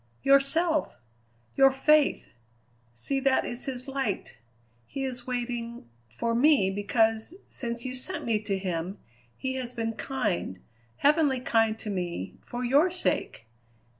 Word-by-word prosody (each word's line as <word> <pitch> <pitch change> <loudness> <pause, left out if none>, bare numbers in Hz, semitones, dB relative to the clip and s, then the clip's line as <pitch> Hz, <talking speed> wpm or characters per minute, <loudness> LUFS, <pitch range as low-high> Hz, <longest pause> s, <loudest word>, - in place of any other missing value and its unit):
"Yourself! 295 +4 +3 0.6
your 270 0 +7
faith! 295 +2 +3 0.7
See, 270 - 0
that 270 -1 +2
is 240 +1 -2
his 255 -1 -4
light. 270 - -3 0.5
He 275 - -4
is 255 -2 -4
waiting 240 - -4 0.2
for 230 - -2
me, 240 -6 +4
because, 220 - +1
since 235 -1 -4
you 255 - -3
sent 255 - -2
me 225 -2 +1
to 200 -2 -1
him, 185 0 -3 0.4
he 260 0 -2
has 250 -1 -4
been 225 -1 -2
kind, 215 - -2 0.4
heavenly 290 -3 +3
kind 225 -3 +2
to 215 - -4
me, 175 - -3
for 245 +1 -4
your 285 +9 +4
sake! 355 - -1
245 Hz, 135 wpm, -28 LUFS, 220-270 Hz, 0.7 s, your